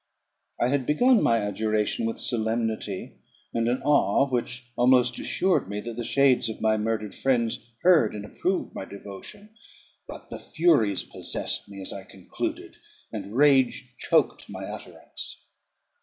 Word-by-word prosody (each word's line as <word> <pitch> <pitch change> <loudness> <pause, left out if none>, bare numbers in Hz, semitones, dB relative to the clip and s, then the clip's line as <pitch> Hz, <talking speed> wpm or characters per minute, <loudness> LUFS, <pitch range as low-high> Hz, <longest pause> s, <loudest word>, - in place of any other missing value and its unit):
I 120 - +2
had 135 -2 0
begun 240 +10 +4
my 115 - +3
adjuration 110 +2 0
with 115 - -4
solemnity, 110 -3 -2 0.3
and 115 0 0
an 125 +2 0
awe 145 -1 +3
which 125 -1 -3
almost 125 0 +4
assured 185 - +1
me 100 0 -3
that 115 0 -6
the 120 - -4
shades 130 -1 +3
of 110 - -6
my 110 0 +2
murdered 110 -1 -2
friends 120 -3 0
heard 170 -13 +5
and 105 -1 -6
approved 185 - -2
my - - -5
devotion; 100 - -10 0.6
but - - -10
the - - -6
furies 150 - +2
possessed - - -3
me 100 -1 -9
as - - -4
I 100 - -7
concluded, 95 -1 -6 0.3
and 105 +1 -6
rage 135 -3 +3
choked - - +1
my - - -6
utterance. - - -9
115 Hz, 145 wpm, -26 LUFS, 105-135 Hz, 0.6 s, heard